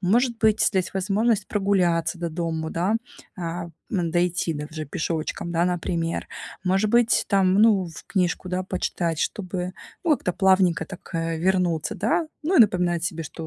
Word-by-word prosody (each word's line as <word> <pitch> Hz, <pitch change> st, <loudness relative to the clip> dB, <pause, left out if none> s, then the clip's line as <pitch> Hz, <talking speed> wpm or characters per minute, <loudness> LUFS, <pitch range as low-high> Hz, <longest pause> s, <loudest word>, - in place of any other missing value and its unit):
Может 230 Hz, +5 st, +2 dB
быть, 220 Hz, -1 st, +3 dB
здесь 190 Hz, -2 st, +1 dB
возможность 205 Hz, +2 st, +1 dB
прогуляться 180 Hz, -4 st, +1 dB
до 170 Hz, -1 st, -3 dB
дому, 160 Hz, -1 st, -3 dB
да, 185 Hz, +6 st, 0 dB, 0.4 s
а, 170 Hz, 0 st, -4 dB, 0.2 s
м, 175 Hz, -5 st, 0 dB
дойти 175 Hz, -1 st, +1 dB
до 150 Hz, 0 st, -4 dB
уже 155 Hz, -1 st, -5 dB
пешочком, 160 Hz, +3 st, -3 dB
да, 170 Hz, 0 st, +1 dB
например. 170 Hz, -2 st, -2 dB, 0.3 s
Может 195 Hz, +3 st, +2 dB
быть, 235 Hz, +1 st, +3 dB
там, 190 Hz, -2 st, +3 dB
ну, 205 Hz, -3 st, +4 dB
в 160 Hz, -, -11 dB
книжку, 185 Hz, -1 st, -1 dB
да, 185 Hz, +1 st, -1 dB
почитать, 175 Hz, -3 st, -2 dB
чтобы, 180 Hz, -2 st, -3 dB, 0.3 s
ну, 320 Hz, -, +4 dB
как-то 180 Hz, -10 st, 0 dB
плавненько 185 Hz, -4 st, +3 dB
так, 180 Hz, -2 st, -11 dB
э, 165 Hz, 0 st, -1 dB
вернуться, 180 Hz, +2 st, 0 dB
да. 315 Hz, -, 0 dB, 0.2 s
Ну 365 Hz, +3 st, +2 dB
и -, -, +9 dB
напоминать 180 Hz, -5 st, +3 dB
себе, 165 Hz, -2 st, -3 dB
что 160 Hz, +2 st, -7 dB
180 Hz, 165 wpm, -24 LUFS, 170-200 Hz, 0.4 s, и